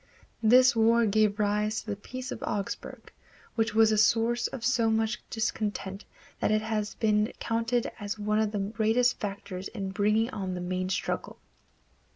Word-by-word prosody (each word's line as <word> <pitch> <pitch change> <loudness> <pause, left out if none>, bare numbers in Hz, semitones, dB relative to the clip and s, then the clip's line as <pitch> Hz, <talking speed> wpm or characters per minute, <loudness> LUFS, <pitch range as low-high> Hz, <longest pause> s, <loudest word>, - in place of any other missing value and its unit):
This 250 +3 +6
war 230 +1 +4
gave 210 0 +2
rise 210 +1 0
to - - -19
the - - -2
Peace 255 +5 -7
of - - -6
Augsburg, 205 -1 -5 0.4
which 225 -1 0
was 220 0 +5
a 215 - +2
source 230 +2 +3
of 240 -3 -6
so 235 -3 +2
much 220 +1 0
discontent 210 -3 -3 0.3
that - - +1
it 215 0 +2
has 215 -1 -2
been 210 0 +1
counted 230 +1 -1
as 205 0 -4
one 210 0 0
of 215 -1 +1
the 210 - -3
great 215 +3 0 0.2
factors 195 -2 -5
in 195 -1 -5
bringing 215 +4 +1
on 190 -5 -4
the - - -4
main 185 +1 -2
struggle. 185 - -3
215 Hz, 170 wpm, -28 LUFS, 205-225 Hz, 0.4 s, This